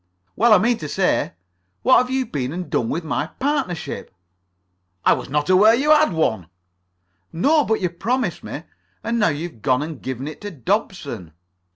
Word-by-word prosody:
"Well, 235 +2 +4
I 215 - +9
mean 230 +5 +1
to 150 - -6
say, 190 +4 0 0.5
what - - +6
have 250 - -1
you 260 0 0
been 135 - -3
and 180 +2 -6
done 115 - 0
with 165 +3 -2
my 150 -1 -2
partnership?" 270 - -2 0.9
"I - - +6
was - - -5
not 145 +1 0
aware 205 +5 +6
that 250 - -1
you 300 - +3
had 310 0 +5
one." 110 - 0 0.8
"No, 290 - +3
but 220 -4 0
you 180 -2 0
promised 230 +3 -2
me. - - -6 0.4
And 235 0 -1
now 210 - +4
you've 150 -5 -5
gone 130 0 +2
and 155 -3 -7
given 130 +1 -5
it 155 - -8
to 205 - -5
Dobson." 145 - -3
180 Hz, 185 wpm, -21 LUFS, 145-230 Hz, 0.9 s, I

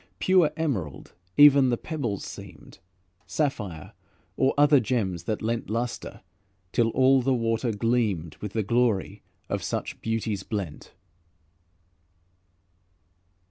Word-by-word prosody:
Pure 185 -4 +4
emerald 110 - -3 0.2
even 140 -2 +7
the 120 - +1
pebbles 125 - -4
seemed, 95 -7 -11 0.5
Sapphire, 105 - -3 0.4
or 135 0 +3
other 145 -1 +6
gems 105 -8 -2
that 110 -1 -2
lent 115 0 -2
Luster, 115 +2 -4 0.5
till 115 +3 +2
all 130 +2 +4
the 130 +1 +1
water 115 0 0
gleamed 105 -8 0
With 105 -2 -7
the 110 - 0
glory 105 -3 0 0.3
of - - -2
such - - -4
beauties 110 -3 -2
blent. 95 -7 -6
115 Hz, 110 wpm, -26 LUFS, 100-130 Hz, 0.5 s, even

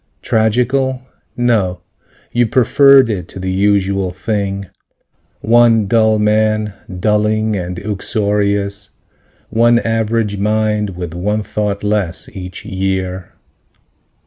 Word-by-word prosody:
Tragical? 125 +4 +1 0.3
No. 110 -7 +1 0.5
You 120 -1 +2
preferred 135 +3 +5
it 95 -7 -3
to - - -9
the 95 0 -3
usual 100 -1 +1
thing: 100 +1 -3 0.8
One 115 -1 +4
dull 110 +1 +3
man, 110 0 +1 0.3
dulling 105 +1 +1
and 90 -1 -4
uxorious, 100 0 -1 0.6
One 120 +2 +4
average 115 -2 -1
mind 105 -1 0
with 90 -2 -5
one 105 +5 -2
thought 105 -1 -3
less, 105 -4 -1
each 90 -1 -7
year. 95 -1 -3
105 Hz, 100 wpm, -16 LUFS, 95-110 Hz, 0.8 s, preferred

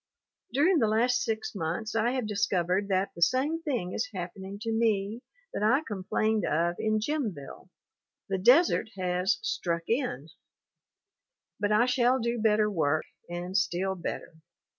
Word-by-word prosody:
During 315 +7 +3
the 225 - +3
last 240 +3 +2
six 220 -1 -2
months 190 +4 -3
I 225 +2 +1
have 255 -3 -1
discovered 195 -2 0
that 190 0 +1
the 170 - -10
same 275 - +2
thing 245 - -2
is 250 +3 -2
happening 190 +2 -6
to 225 - -2
me 220 -1 0 0.3
that - - -3
I 235 +7 +4
com 200 -8 -6
plained 215 +1 +1
of 170 +3 +1
in 215 0 +1
Jimville. 215 - -4 0.6
the 190 -1 -1
desert 250 - +4
has 180 +2 +1
"struck 170 - -1
in." 225 - -1 1.3
But 205 0 0
I 215 +3 +4
shall 250 0 +3
do 235 -1 -1
better 215 -1 +3
work, 155 -6 0 0.2
and 175 +2 -5
still 190 -1 +1
better. 175 -1 -5
210 Hz, 150 wpm, -28 LUFS, 185-240 Hz, 1.3 s, I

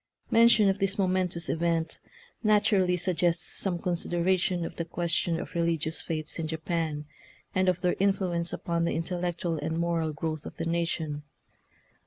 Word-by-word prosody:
Mention 230 -2 +6
of 195 0 +1
this 195 0 +1
momentous 185 -3 0
event 165 -1 0 0.4
natu 210 -1 +4
rally 180 -1 +2
suggests 175 -1 +1
some 185 -3 +2
consideration 175 0 0
of - - -7
the 170 - -1
question 170 0 -1
of - - -7
religious 165 -2 0
faiths 155 0 -3
in 160 - -2
Japan, 160 -1 -2 0.5
and 185 0 +3
of 180 0 0
their 180 - +2
influence 185 -3 +1
upon 170 -1 -1
the - - 0
intellectual 175 -1 -2
and 160 +2 -2
moral 170 -2 0
growth 155 0 -4
of - - -10
the - - -3
nation. 165 -3 -1
170 Hz, 155 wpm, -28 LUFS, 165-185 Hz, 0.5 s, Mention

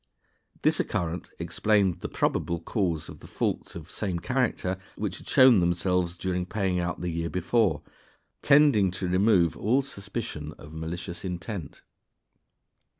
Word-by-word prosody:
This - - +3
occurrence 85 0 -2
explained 95 +2 +1
the - - -5
probable 85 0 0
cause 85 -2 -1
of - - -10
the - - -13
faults - - -2
(of - - -8
same 95 -4 -2
character) 90 +2 -1 0.2
which 100 -4 -3
had - - -15
shown 130 -6 +7
themselves 85 0 +1
during 90 0 -1
paying 95 -3 0
out 90 -1 -2
the 90 -1 -2
year 85 0 -2
before, 100 +4 +1 0.6
tending 140 -9 +5
to 90 +1 -4
remove 90 -2 +3
all 130 +6 +2
suspicion 100 - -6
of 75 +1 -12
malicious 85 +2 -5
intent. 90 -1 -6
90 Hz, 140 wpm, -27 LUFS, 85-105 Hz, 0.6 s, shown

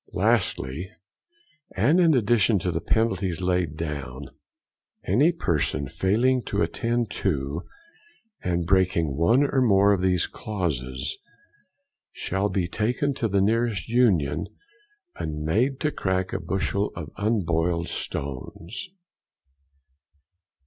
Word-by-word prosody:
Lastly. 75 +9 0 0.8
And 140 - +3
in 165 -4 +5
addition 115 -2 +3
to 90 -1 -1
the 80 - -2
penalties 95 -6 0
here 90 - -4
laid 90 -4 0
down, 70 -4 -5 0.7
any 150 +7 +3
person 75 - -1
failing 120 - +2
to 100 +1 0
attend 120 -1 -1
to, 75 -3 -1 0.8
and 85 -1 0
breaking 85 -5 +2
one 115 - +4
or 140 -2 +1
more 100 -4 +5
of 95 - 0
these 90 -2 +2
clauses, 65 - -3
they - - -42 0.9
shall 95 +2 -1
be 95 -4 0
taken 125 - 0
to 125 -4 -1
the 100 -1 +1
nearest 110 -3 0
Union, 90 - +2 0.7
and 75 -1 -4
made 125 - +1
to 150 - +1
crack 95 -4 -1
a - - -1
bushel 100 +1 -1
of 75 -4 -7
unboiled 85 -5 0
stones. 80 - -5
95 Hz, 120 wpm, -25 LUFS, 80-115 Hz, 0.9 s, in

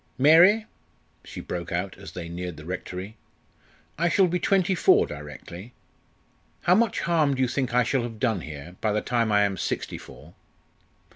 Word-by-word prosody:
"Mary!" 175 +10 +6 0.6
she - - -9
broke 85 -1 -6
out 90 +2 -2
as 95 0 -11
they 85 -2 -6
neared 85 0 -6
the 75 - -11
Rectory, 90 +4 -6 0.8
"I 170 +1 +2
shall 190 +2 +4
be 180 0 -1
twenty 190 +1 +2
four 180 - +4
directly. 75 - -10 0.9
How 175 - +4
much 225 +1 +2
harm 155 -5 +2
do 130 - -2
you - - +2
think 125 -1 -2
I 125 - +5
shall 125 +2 0
have 115 -2 -6
done 110 -7 0
here 75 +3 -9
by 105 -2 +1
the 105 - 0
time 115 -3 0
I 105 0 +4
am 100 -2 -1
sixty - - -3
four?" - - -14
115 Hz, 175 wpm, -25 LUFS, -, 0.9 s, Mary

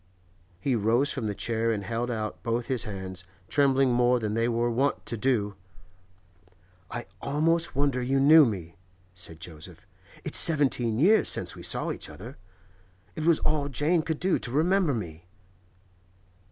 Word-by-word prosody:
He 125 +6 0
rose 115 +6 +2
from 130 -6 -3
the 105 - -3
chair 115 +1 -1
and 105 -2 -2
held 115 +4 -3
out 110 -3 -4
both 115 +1 -2
his 130 -4 0
hands, 95 -3 -6 0.2
trembling 135 -1 +3
more 125 +1 +3
than 105 -2 -3
they 115 +2 +1
were 120 0 0
wont 135 +5 0
to 115 - -2
do. 110 -3 0 1.4
'I 120 0 -6 0.2
almost 165 +3 0
wonder 140 -2 +1
you 135 +2 +1
knew 155 +3 +8
me,' 90 - -3 0.4
said 90 -3 -6
Joseph. 80 -2 -11 0.4
'It's - - +1
seventeen 130 -8 +2
years 200 - +4
since - - 0
we - - -10
saw - - -2
each - - -5
other. - - -11 0.8
It 155 - -4
was 165 -2 +5
all 150 -2 0
Jane 155 +5 +1
could 160 -1 -3
do 185 0 +1
to - - -3
remember 165 +1 +2
me. 85 -5 -7
120 Hz, 160 wpm, -27 LUFS, 110-145 Hz, 1.4 s, knew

